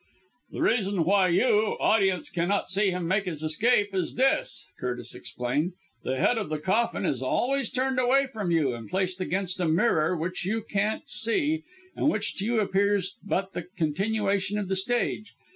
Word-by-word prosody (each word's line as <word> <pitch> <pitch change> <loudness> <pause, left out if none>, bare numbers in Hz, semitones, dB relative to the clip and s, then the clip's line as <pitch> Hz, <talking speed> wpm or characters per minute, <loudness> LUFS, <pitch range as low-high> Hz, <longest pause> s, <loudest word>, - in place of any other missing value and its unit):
"The - - -6
reason 200 -6 +2
why 195 +1 +4
you, 210 +4 +2
audience, 200 +7 +2
cannot 185 +3 0
see 200 +1 +2
him 180 -2 -2
make 195 +3 +1
his 160 -4 -4
escape 205 +6 +2
is 185 -3 -2
this," 270 - +1
Curtis 125 -1 -4
explained; 145 +9 -2 0.3
"the 130 +1 -2
head 230 - +2
of 210 - -4
the 155 - -1
coffin 200 +10 0
is 130 - -1
always 260 - 0
turned 260 0 0
away 265 +2 +4
from 220 -8 -4
you 155 -6 +2
and 115 -2 -8
placed 185 -1 -1
against 185 0 -1
a 175 - +1
mirror 165 -1 +2
which 175 +3 -3
you 215 +4 -1
can't 210 0 -1
see, 305 +7 +1 0.3
and 295 - +2
which 210 -6 -1
to 195 - -2
you 230 0 +1
appears 200 -1 +1
but 195 -1 -2
the 175 -1 -5
continuation 200 +4 0
of 200 -3 -3
the 190 - +1
stage. 215 +1 -1
195 Hz, 175 wpm, -27 LUFS, 175-220 Hz, 0.3 s, why